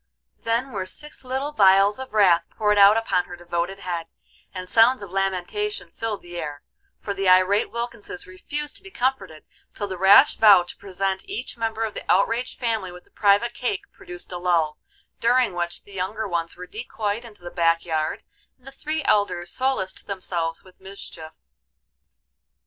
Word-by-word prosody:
Then 235 Hz, +4 st, -1 dB
were 190 Hz, -4 st, -4 dB
six 300 Hz, +8 st, -8 dB
little 265 Hz, +3 st, -3 dB
vials 200 Hz, -2 st, +5 dB
of 265 Hz, -, -7 dB
wrath 180 Hz, -6 st, +4 dB
poured 210 Hz, -1 st, +1 dB
out 200 Hz, +2 st, +8 dB
upon 185 Hz, -5 st, +1 dB
her 175 Hz, -, -9 dB
devoted 175 Hz, +2 st, -3 dB
head, 175 Hz, -4 st, -4 dB, 0.4 s
and 185 Hz, -1 st, -7 dB
sounds 230 Hz, +3 st, +4 dB
of 195 Hz, -, -9 dB
lamentation 195 Hz, -, -2 dB
filled 225 Hz, -2 st, -4 dB
the 175 Hz, 0 st, -9 dB
air, 145 Hz, -3 st, -5 dB, 0.3 s
for 200 Hz, -, -4 dB
the 195 Hz, -1 st, +1 dB
irate 185 Hz, +3 st, +4 dB
Wilkinses 235 Hz, -5 st, -5 dB
refused 290 Hz, +11 st, -5 dB
to -, -, -16 dB
be 390 Hz, -, -12 dB
comforted 200 Hz, -, -2 dB, 0.3 s
till 205 Hz, -, -3 dB
the 185 Hz, -2 st, -6 dB
rash 205 Hz, +10 st, +7 dB
vow 205 Hz, -5 st, +7 dB
to 175 Hz, -, -10 dB
present 190 Hz, 0 st, -3 dB
each 245 Hz, +4 st, -4 dB
member 225 Hz, -1 st, -2 dB
of 220 Hz, -2 st, -2 dB
the -, -, -6 dB
outraged 230 Hz, +6 st, +1 dB
family 225 Hz, -6 st, -1 dB
with 180 Hz, 0 st, -13 dB
a -, -, -30 dB
private 205 Hz, +3 st, +3 dB
cake 240 Hz, -7 st, -2 dB
produced 175 Hz, +1 st, -9 dB
a 180 Hz, -, -4 dB
lull, 170 Hz, -4 st, +1 dB, 0.4 s
during 240 Hz, -2 st, +3 dB
which 175 Hz, 0 st, -4 dB
the 200 Hz, -, -16 dB
younger 200 Hz, +4 st, -3 dB
ones 170 Hz, -2 st, -3 dB
were 180 Hz, -, -7 dB
decoyed 215 Hz, +1 st, -4 dB
into 210 Hz, -6 st, -14 dB
the 175 Hz, -, -7 dB
back 165 Hz, 0 st, +2 dB
yard, 155 Hz, -2 st, -2 dB, 0.3 s
and 255 Hz, -, -29 dB
the 270 Hz, -, -9 dB
three 305 Hz, +3 st, -3 dB
elders 180 Hz, -7 st, +1 dB
solaced 260 Hz, -8 st, -2 dB
themselves 175 Hz, -4 st, -3 dB
with 185 Hz, -1 st, -20 dB
mischief. 190 Hz, -4 st, -9 dB
195 Hz, 175 wpm, -24 LUFS, 180-230 Hz, 0.4 s, out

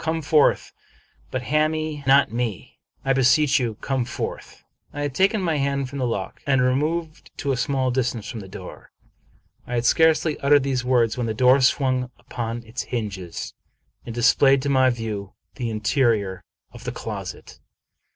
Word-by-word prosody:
Come 160 Hz, -1 st, -2 dB
forth, 150 Hz, 0 st, +3 dB, 0.6 s
but 130 Hz, -1 st, -3 dB
hami 155 Hz, +4 st, +2 dB
me 155 Hz, -2 st, -4 dB
not. 135 Hz, +1 st, +5 dB, 0.8 s
I 135 Hz, -, +3 dB
beseech 135 Hz, +3 st, +4 dB
you, 115 Hz, -4 st, -2 dB
come 135 Hz, -2 st, -1 dB
forth." 120 Hz, -, -6 dB, 0.3 s
I 145 Hz, -, -5 dB
had 145 Hz, -2 st, -2 dB
taken 195 Hz, -, +2 dB
my 165 Hz, -4 st, +1 dB
hand 140 Hz, -1 st, -1 dB
from 140 Hz, -, -5 dB
the 125 Hz, -, 0 dB
lock 100 Hz, -5 st, -4 dB
and 135 Hz, -2 st, +3 dB
removed 155 Hz, +6 st, -1 dB
to 140 Hz, -1 st, -1 dB
a -, -, +1 dB
small 130 Hz, +1 st, 0 dB
distance 120 Hz, -3 st, -1 dB
from 120 Hz, -3 st, -6 dB
the 95 Hz, -, -9 dB
door. 95 Hz, -1 st, -10 dB, 0.8 s
I 125 Hz, -, -3 dB
had 120 Hz, 0 st, 0 dB
scarcely 160 Hz, +1 st, +3 dB
uttered 140 Hz, 0 st, +4 dB
these 130 Hz, -2 st, -1 dB
words, 125 Hz, -2 st, +2 dB
when 120 Hz, -, -1 dB
the 110 Hz, -, -2 dB
door 130 Hz, +4 st, +5 dB
swung 130 Hz, -1 st, +2 dB
upon 120 Hz, -1 st, -5 dB
its 115 Hz, +3 st, -5 dB
hinges 100 Hz, -8 st, -5 dB, 0.5 s
and 115 Hz, -, -7 dB
displayed 135 Hz, +3 st, +4 dB
to 140 Hz, -, -1 dB
my 130 Hz, -1 st, +4 dB
view 110 Hz, -5 st, -4 dB, 0.2 s
the 120 Hz, -3 st, -2 dB
interior 110 Hz, -3 st, 0 dB, 0.3 s
of -, -, -12 dB
the -, -, -3 dB
closet. -, -, -7 dB
130 Hz, 170 wpm, -23 LUFS, 115-140 Hz, 0.8 s, not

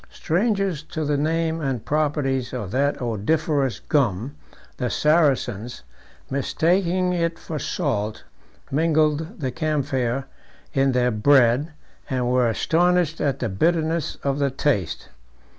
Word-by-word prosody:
Strangers 195 Hz, -2 st, 0 dB
to 160 Hz, -1 st, -5 dB
the 145 Hz, 0 st, +1 dB
name 160 Hz, +2 st, 0 dB
and 135 Hz, -6 st, -2 dB
properties 145 Hz, -4 st, 0 dB
of 105 Hz, -7 st, -4 dB
that 140 Hz, +3 st, +1 dB
odoriferous 135 Hz, +4 st, 0 dB
gum, 125 Hz, -, 0 dB, 0.4 s
the 125 Hz, -2 st, -1 dB
Saracens, 130 Hz, -, +1 dB, 0.4 s
mistaking 180 Hz, +6 st, +1 dB
it 170 Hz, -1 st, -1 dB
for 155 Hz, -2 st, -5 dB
salt, 115 Hz, -, -2 dB, 0.5 s
mingled 155 Hz, +4 st, +1 dB
the 130 Hz, -2 st, -1 dB
camphire 135 Hz, -4 st, -1 dB, 0.5 s
in 135 Hz, -1 st, +2 dB
their 125 Hz, 0 st, +2 dB
bread, 130 Hz, +5 st, +3 dB, 0.4 s
and 125 Hz, -2 st, 0 dB
were 125 Hz, -1 st, +3 dB
astonished 170 Hz, +5 st, +1 dB
at 140 Hz, -2 st, +1 dB
the 120 Hz, -, -2 dB
bitterness 160 Hz, -, 0 dB
of 140 Hz, 0 st, 0 dB
the 140 Hz, -1 st, +2 dB
taste. 130 Hz, -, -1 dB
145 Hz, 120 wpm, -23 LUFS, 125-160 Hz, 0.5 s, bread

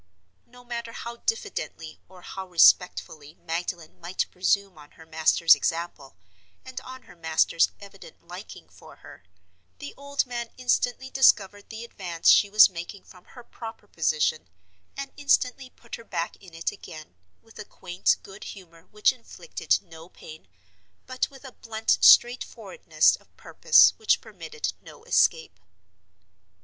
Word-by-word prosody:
No 250 Hz, 0 st, -17 dB
matter 235 Hz, -1 st, -6 dB
how 235 Hz, 0 st, -7 dB
diffidently 165 Hz, -, -4 dB
or 185 Hz, -1 st, -16 dB
how 190 Hz, -1 st, -8 dB
respectfully 165 Hz, -3 st, +3 dB
Magdalen 170 Hz, -1 st, -6 dB
might 175 Hz, +2 st, -2 dB
presume 190 Hz, -1 st, 0 dB
on 145 Hz, 0 st, -16 dB
her 160 Hz, -, -15 dB
master's 160 Hz, +1 st, +4 dB
example, 165 Hz, -5 st, -3 dB, 0.5 s
and 260 Hz, 0 st, -8 dB
on 260 Hz, 0 st, -11 dB
her -, -, -17 dB
master's 165 Hz, 0 st, +2 dB
evident 205 Hz, -, -15 dB
liking -, -, -11 dB
for -, -, -16 dB
her, -, -, -13 dB, 0.6 s
the 285 Hz, -, -9 dB
old 280 Hz, 0 st, -2 dB
man 240 Hz, -2 st, -5 dB
instantly 255 Hz, +1 st, -1 dB
discovered 205 Hz, -6 st, +3 dB
the 225 Hz, +1 st, -8 dB
advance 175 Hz, -7 st, -1 dB
she 205 Hz, -, +5 dB
was 215 Hz, +1 st, +8 dB
making 180 Hz, +2 st, -9 dB
from 180 Hz, -1 st, -18 dB
her 245 Hz, -, -14 dB
proper 225 Hz, -2 st, -10 dB
position, 155 Hz, -, -1 dB, 0.5 s
and 275 Hz, -1 st, -6 dB
instantly 270 Hz, -2 st, +1 dB
put 235 Hz, -2 st, -22 dB
her 230 Hz, -, -13 dB
back 170 Hz, -6 st, -4 dB
in 180 Hz, -4 st, -16 dB
it 165 Hz, -, -2 dB
again, 155 Hz, -, -12 dB, 0.3 s
with 225 Hz, 0 st, -18 dB
a -, -, -5 dB
quaint 180 Hz, -2 st, -1 dB
good 195 Hz, +1 st, -12 dB
humor 170 Hz, -3 st, -12 dB
which 210 Hz, +5 st, +2 dB
inflicted 255 Hz, -, -3 dB
no 165 Hz, -1 st, -14 dB
pain, 155 Hz, -, -14 dB, 0.6 s
but 255 Hz, 0 st, -2 dB
with 275 Hz, 0 st, -16 dB
a 260 Hz, -, -9 dB
blunt 225 Hz, -1 st, -1 dB
straightforwardness 250 Hz, -, +4 dB
of -, -, -29 dB
purpose -, -, +5 dB
which 440 Hz, -1 st, +2 dB
permitted 455 Hz, 0 st, -6 dB
no 445 Hz, -, -15 dB
escape. 160 Hz, -, +1 dB
200 Hz, 145 wpm, -25 LUFS, 165-245 Hz, 0.6 s, was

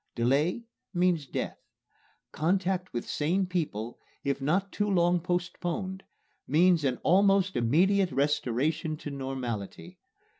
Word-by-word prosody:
Delay 140 Hz, -, +1 dB, 0.3 s
means 175 Hz, -5 st, +2 dB
death. -, -, -4 dB, 0.7 s
Contact 185 Hz, +2 st, 0 dB
with 120 Hz, -, -4 dB
sane 175 Hz, +6 st, 0 dB
people, 145 Hz, -, -3 dB, 0.2 s
if 140 Hz, -1 st, -1 dB
not 185 Hz, +8 st, 0 dB
too 205 Hz, 0 st, -1 dB
long 175 Hz, -2 st, +3 dB
postponed, 180 Hz, +2 st, -3 dB, 0.5 s
means 170 Hz, +2 st, +4 dB
an 130 Hz, -3 st, +1 dB
almost 195 Hz, +1 st, +4 dB
immediate 180 Hz, -, +3 dB
restoration 145 Hz, +3 st, 0 dB
to 145 Hz, -, -7 dB
normality. 130 Hz, -, -5 dB
170 Hz, 110 wpm, -29 LUFS, 140-185 Hz, 0.7 s, means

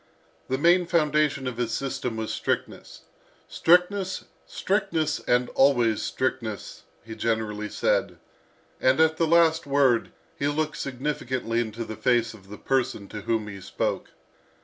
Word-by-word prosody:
The 130 Hz, -, 0 dB
main 175 Hz, +4 st, +4 dB
foundation 150 Hz, -4 st, +1 dB
of 125 Hz, -2 st, -4 dB
his 120 Hz, -2 st, -1 dB
system 130 Hz, -2 st, -3 dB
was 110 Hz, -1 st, -3 dB
strictness. -, -, -3 dB, 0.5 s
"Strictness, 185 Hz, +2 st, +2 dB, 0.2 s
strictness, 170 Hz, -7 st, -1 dB
and 125 Hz, 0 st, +1 dB
always 120 Hz, -5 st, +3 dB
strictness!" 115 Hz, -5 st, -3 dB, 0.2 s
he 115 Hz, -, -7 dB
generally 110 Hz, -2 st, -2 dB
said; -, -, 0 dB, 0.6 s
and 130 Hz, +3 st, +3 dB
at 160 Hz, 0 st, +4 dB
the 165 Hz, -, +2 dB
last 165 Hz, -2 st, +3 dB
word 135 Hz, -4 st, +2 dB, 0.3 s
he 140 Hz, -, +1 dB
looked 150 Hz, +1 st, -1 dB
significantly 130 Hz, -3 st, -2 dB
into 115 Hz, 0 st, -3 dB
the 110 Hz, -, -6 dB
face 115 Hz, +1 st, +1 dB
of 95 Hz, -3 st, -16 dB
the 105 Hz, -, -8 dB
person 130 Hz, -6 st, -1 dB
to 105 Hz, -, -7 dB
whom 110 Hz, 0 st, -1 dB
he 100 Hz, -2 st, -8 dB
spoke. -, -, -3 dB
130 Hz, 140 wpm, -26 LUFS, 115-155 Hz, 0.6 s, main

